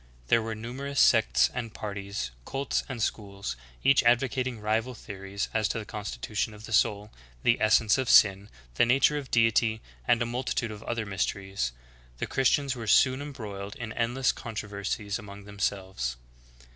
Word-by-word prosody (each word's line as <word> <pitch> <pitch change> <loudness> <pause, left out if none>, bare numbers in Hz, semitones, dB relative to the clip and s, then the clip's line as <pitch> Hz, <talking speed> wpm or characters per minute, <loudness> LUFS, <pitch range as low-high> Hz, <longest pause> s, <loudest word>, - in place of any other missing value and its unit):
There 115 - +5
were 110 0 -4
numerous 135 +5 -4
sects - - +5
and 115 -3 -5
parties, 100 - -4
cults 135 - -1
and 120 -4 -2
schools, 100 - -3 0.3
each 135 -1 +5
advocating 125 0 +1
rival 110 +4 -1
theories 100 -2 -5
as 110 -1 +2
to - - -2
the 110 - -5
constitution 105 +1 -4
of 105 +1 -11
the 110 - -6
soul, 105 0 +2 0.3
the 120 - +3
essence 110 +2 +4
of 130 - -1
sin, 100 0 +6 0.2
the - - +4
nature 135 +4 +4
of 135 -3 -9
Deity, 115 -1 +3 0.3
and 120 - +4
a 120 - +1
multitude 120 -1 -2
of 105 0 -8
other 115 -2 -2
mysteries. 95 -7 -2 0.5
The - - -2
Christians 135 +1 +2
were 115 -2 -6
soon 130 +4 +4
embroiled 105 -8 -7
in 115 -2 -6
endless 125 +2 +1
controversies 105 -1 -4
among 100 -1 -10
themselves. 95 -10 -3
110 Hz, 160 wpm, -28 LUFS, 100-120 Hz, 0.5 s, sin